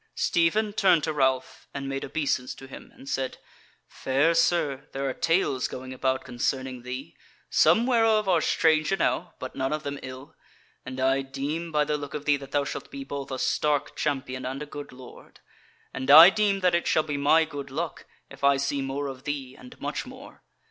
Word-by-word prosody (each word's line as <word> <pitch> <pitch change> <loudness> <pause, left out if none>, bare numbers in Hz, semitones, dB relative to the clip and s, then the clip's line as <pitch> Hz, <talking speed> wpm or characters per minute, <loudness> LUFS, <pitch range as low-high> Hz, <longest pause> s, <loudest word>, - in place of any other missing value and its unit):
Stephen 205 +5 +1
turned 185 -7 +4
to 155 - -1
Ralph 130 -2 0
and 140 -1 -4
made 135 0 -3
obeisance 135 -3 -2
to 135 - -11
him 135 - -12
and 135 - -14
said: 135 -1 -2 0.5
"Fair 140 +5 +1
Sir, 150 -5 +1
there 135 0 -2
are 130 - -1
tales 165 -6 +1
going 130 0 -7
about 130 0 -1
concerning 130 +1 -3
thee, 130 +5 -7 0.4
some 230 - +4
whereof 225 -4 +3
are 175 -4 +3
strange 155 +1 +2
enow, 180 -2 0
but 130 - -7
none 135 0 -1
of 155 0 -2
them 140 0 -4
ill; 130 +1 -9 0.5
and 130 0 -6
I 135 +1 +2
deem 140 +5 -4
by 150 -1 +2
the 150 0 -1
look 145 0 -7
of 150 -1 -5
thee 145 -1 +3
that 140 -1 -10
thou 145 0 +1
shalt - - -6
be 275 -1 -7
both 140 - -6
a 130 - -3
stark 145 +2 0
champion 135 -3 -2
and 135 +3 -4
a - - -7
good 145 0 -9
lord; 125 -1 -14 0.5
and 130 +1 -4
I 160 +6 +11
deem 200 -2 +1
that 180 -1 +3
it 170 - +1
shall 155 - +3
be 150 -2 -3
my 155 +3 +4
good 145 -3 -7
luck, 160 +5 -4 0.2
if - - -14
I 140 0 +5
see 140 0 -1
more 135 +1 -3
of 130 -2 -7
thee, 135 -3 -4
and 125 - -14
much - - -4
more. - - -12
140 Hz, 200 wpm, -26 LUFS, 130-160 Hz, 0.5 s, I